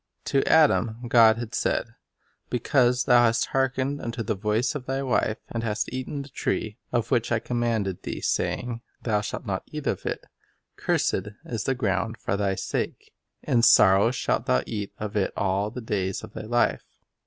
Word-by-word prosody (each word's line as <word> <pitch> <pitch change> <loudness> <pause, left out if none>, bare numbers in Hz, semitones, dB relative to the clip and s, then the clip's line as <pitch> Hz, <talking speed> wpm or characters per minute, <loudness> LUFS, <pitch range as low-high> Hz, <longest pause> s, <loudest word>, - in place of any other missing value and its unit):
To 135 - +2
Adam 120 -7 +3
God 115 -2 +6
had 120 -1 -6
said: - - -1 0.6
''Because 125 0 +2
thou 120 -2 +6
hast 115 0 +2
hark 135 -1 +2
ened 140 +2 -2
unto 115 0 -3
the 110 - -1
voice 105 +4 0
of 140 -4 -6
thy 135 +1 -1
wife, 125 -4 +1
and 115 - -2
hast 110 +1 -2
eaten 130 +2 -4
of - - -6
the 140 - -13
tree, 110 -3 -2
of 120 -2 -1
which 120 -3 +1
I 120 - +3
commanded 115 -5 -1
thee, - - -5
saying, 120 -1 -1 0.2
Thou 105 -3 +1
shalt 105 - -5
not 95 -3 -2
eat 150 -1 -7
of - - -2
it; - - -3 0.5
cursed - - 0 0.2
is 115 -3 -4
the 135 - +1
ground 115 -1 -1
for 95 - -2
thy 100 -1 0
sake; - - -4 0.3
in 120 - +2
sorrow 100 -2 +6
shalt 120 - -1
thou 65 +1 +2
eat 105 -3 -4
of 105 0 -5
it 100 -2 0
all 100 +1 0
the 125 +3 -7
days 95 -4 -2
of - - -10
thy - - -6
life. 120 +1 +1
115 Hz, 190 wpm, -26 LUFS, 105-125 Hz, 0.6 s, God